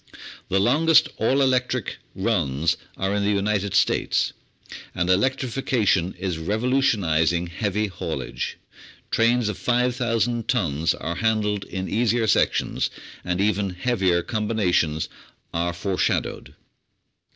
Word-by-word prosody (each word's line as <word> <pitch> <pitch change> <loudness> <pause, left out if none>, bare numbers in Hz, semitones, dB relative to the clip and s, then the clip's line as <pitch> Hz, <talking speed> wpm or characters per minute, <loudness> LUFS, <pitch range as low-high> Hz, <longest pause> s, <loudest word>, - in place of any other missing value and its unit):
The 95 - +2
longest 150 +9 +4
"all 135 +5 +2
electric" 125 -3 0 0.2
runs 70 +5 +1 0.2
are 95 +1 -1
in 105 - 0
the 100 - +1
United 100 -1 0
States, - - +2 0.6
and 90 0 +1
electrification 110 -4 +1
is 90 -2 -3
revolutionising 90 - +1
heavy 100 +4 -1
haul 95 -4 -4
age; - - -5 0.5
trains 115 0 +3
of 105 - -3
5,000 120 -2 0
tons 80 -1 +1
are 85 +1 -4
handled 105 -3 0
in 95 0 -5
easier 115 +1 +1
sections, 110 - +1 0.3
and 90 0 -2
even 100 -1 +1
heavier 90 -3 0
combinations 95 -8 0 0.5
are 85 +1 0
foreshadowed. 90 +2 -2
105 Hz, 110 wpm, -24 LUFS, 90-120 Hz, 0.6 s, longest